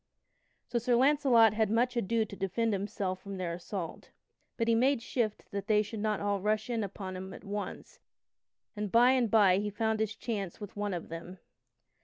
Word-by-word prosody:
So 240 - -1
Sir 240 +1 +2
Launcelot 255 -4 +5
had 215 -1 +1
much 245 +3 +1
ado 230 0 +1
to 200 - -10
defend 215 +4 0
himself 195 -1 -3
from 200 -1 -7
their 175 -2 -2
assault. 175 0 -6 0.5
But 230 - 0
he 230 - +4
made 255 +3 +3
shift 230 -4 -2
that 200 0 -4
they 210 -1 +4
should 215 +1 -7
not 210 -1 0
all 200 -1 -1
rush 215 +3 0
in 230 -2 0
upon 195 -1 -6
him 190 +1 -7
at - - -12
once, 200 -1 -6 0.8
and 210 -2 -3
by 240 +2 +6
and 250 -4 +2
by 195 -4 +5
he 210 +1 -2
found 220 +1 -1
his 220 -1 -1
chance 205 -6 -4
with 205 -2 -8
one 205 -2 -2
of 170 - -6
them. 170 +3 -8
210 Hz, 195 wpm, -31 LUFS, 195-230 Hz, 0.8 s, by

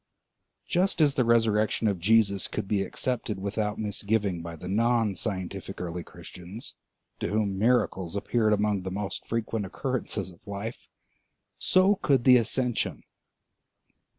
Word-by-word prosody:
Just 185 0 +1
as 150 -3 +5
the 130 - +2
resurrection 115 -2 +2
of 100 -4 0
Jesus 100 0 +3
could - - -4
be 100 -1 +1
accepted 110 0 -2
without 105 +1 -2
misgiving 105 -3 -1
by 85 0 -7
the 80 - -9
non 115 +1 +2
scientific 95 +1 -4
early 90 0 -4
Christians, 90 +6 -9 0.5
to - - -1
whom 100 -1 0
miracles 100 -6 +1
appeared 110 +2 +1
among 105 -1 +1
the 95 - -4
most 100 +1 -4
frequent 115 -1 -2
occurrences 105 -2 -3
of 85 +4 -21
life, 100 +4 -6 0.7
so 190 +2 +4
could 135 -8 +2
the 125 0 +8
ascension. 120 +1 0
105 Hz, 135 wpm, -27 LUFS, 95-115 Hz, 0.7 s, the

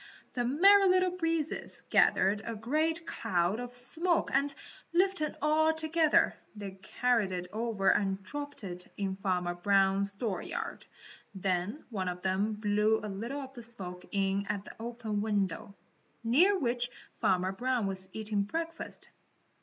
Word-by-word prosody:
The 245 - 0
Merry 385 +10 +6
Little 370 0 +3
Breezes 330 -3 -2
gathered 200 +2 +4
a 230 0 -4
great 310 +9 0
cloud 180 - 0
of 245 0 -6
smoke 330 +8 +2
and, 280 +1 +2 0.4
lifting 360 -4 +1
all 315 +1 +3
together, 315 0 +3 0.2
they 200 -2 -6
carried 235 -5 +1
it 180 -1 -3
over 220 -3 +1
and 195 -1 0
dropped 290 +3 -6
it 180 -2 -7
in 195 -2 -2
Farmer 180 -3 -1
Brown's 195 +2 +3
dooryard. 205 -2 -4 0.5
Then 190 - -1
one 190 -4 -2
of 180 0 -4
them 195 +3 +1
blew 210 +1 +2
a 210 - -4
little 235 +9 -4
of 265 -1 -9
the 245 - -9
smoke 185 -6 -4
in 195 0 0
at 205 -1 -3
an - - -9
open 225 -3 -3
window, 200 -3 -1 0.5
near 340 - +4
which 245 -5 0 0.3
Farmer 185 0 +2
Brown 245 +2 0
was 190 -1 -1
eating 215 -1 -1
breakfast. 330 +10 -5
220 Hz, 145 wpm, -31 LUFS, 195-290 Hz, 0.5 s, Merry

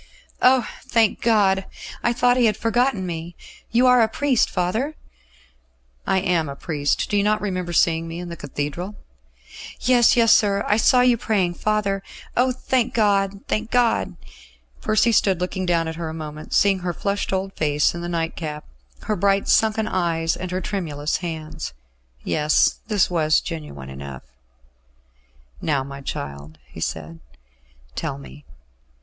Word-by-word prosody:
"Oh! 255 -2 +5
thank 225 -2 +1
God! 195 -4 +3 0.4
I 240 - +2
thought 245 +1 +3
He 245 -2 +4
had 210 -1 0
forgotten 230 -3 +1
me. 170 0 -5 0.3
You 240 +2 +3
are 250 -1 +6
a 225 - +4
priest, 260 +2 +1
father?" 220 - -1 1.1
"I 190 - +3
am 170 -5 +1
a 140 - -6
priest. 145 -2 -1
Do 205 - 0
you - - +4
not 210 +1 +2
remember 185 -4 -3
seeing 165 -1 +2
me 165 +1 -6
in 175 0 -6
the 170 - -6
Cathedral?" 150 +7 -5 0.8
"Yes, 245 -1 +4
yes, 230 -1 +6
sir; 200 -1 +3
I 210 - +3
saw 250 +3 +5
you 250 -1 +4
praying, 195 -6 0
father. 200 +1 0 0.3
Oh! 255 +1 +3
thank 255 -1 -1
God, 200 -3 +2
thank 220 +1 -1
God!" 245 -2 +1 0.7
Percy 215 +2 +3
stood 195 -5 +3
looking 185 +1 -3
down 165 -2 +2
at 160 0 -5
her 165 -2 -4
a 160 - -6
moment, 155 -1 -8
seeing 195 -2 +4
her 175 -1 -3
flushed 200 +3 -2
old 195 0 -2
face 150 -1 +1
in 170 - -6
the 175 - -4
nightcap, 165 -2 -3 0.4
her 215 - -1
bright 195 +1 +1
sunken 220 0 +3
eyes 165 -3 0
and 185 0 -5
her 185 +1 -2
tremulous 160 -7 -2
hands. 160 - -6 0.5
Yes; 150 0 +2
this 205 -5 +2
was 155 -3 +3
genuine 70 - -7
enough. 65 -1 -8 1.4
"Now, 140 -4 0
my 140 0 -9
child," 70 - -6
he 60 - -11
said, 80 +1 -4 0.7
"tell - - -3
me." 70 +1 -13
185 Hz, 155 wpm, -22 LUFS, 160-215 Hz, 1.4 s, are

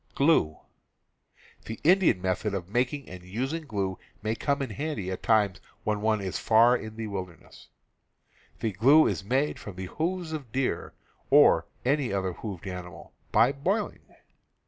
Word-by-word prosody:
The 140 - +3 1.3
Indian 175 - +4
method 95 +2 -1
of 90 -3 -4
making 125 +6 -1
and 90 -1 -9
using 130 - -4
glue 95 -5 -2 0.2
may 110 0 0
come 140 +4 -1
in 130 - -5
handy 120 -7 -3
at 95 - -5
times 105 -4 +2 0.2
when 105 -1 -1
one 110 -1 +1
is 95 -2 -3
far 115 +3 +5
in 110 -2 -6
the 115 0 -4
wilder 95 -4 -5
ness. - - -17 0.9
The 110 - 0
glue 135 +11 +6
is - - -1
made 130 +8 0
from 100 - -9
the 95 +1 -5
hoofs 170 - -3
of 145 -7 -6
deer, 130 +1 -2 0.4
or - - +6 0.2
any 140 -2 +1
other 95 -2 -1
hoofed 95 -3 -7
animals, 90 -2 -8 0.2
by 120 +3 +5
boiling. 185 +10 -1
110 Hz, 155 wpm, -27 LUFS, 95-140 Hz, 1.3 s, glue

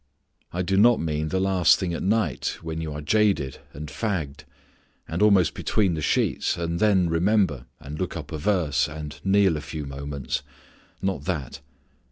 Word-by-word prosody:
I 90 +1 -2
do 95 +2 0
not 115 +3 +6
mean 80 -1 -1
the 95 +4 -1
last 95 -2 +4
thing 90 -3 -2
at - - -3
night 100 - 0
when 80 0 -4
you 80 -2 -4
are 75 +1 -5
jaded 95 -6 +1
and 75 +2 -7
fagged, 75 -2 -3 0.6
and - - -3
almost 100 -5 +5
between 100 -5 +1
the 80 - -3
sheets, 70 - +1
and 85 0 -2
then 95 -4 +4
remember 85 - +1
and 75 +1 -8
look 90 -1 -3
up 80 -1 -8
a 80 - -4
verse 75 -6 +1
and 75 -1 -7
kneel 95 -4 +3
a - - -5
few 75 -1 -6
moments: 70 0 -4 0.6
not 95 -7 -1
that. 75 -7 -3
85 Hz, 175 wpm, -25 LUFS, 75-95 Hz, 0.6 s, not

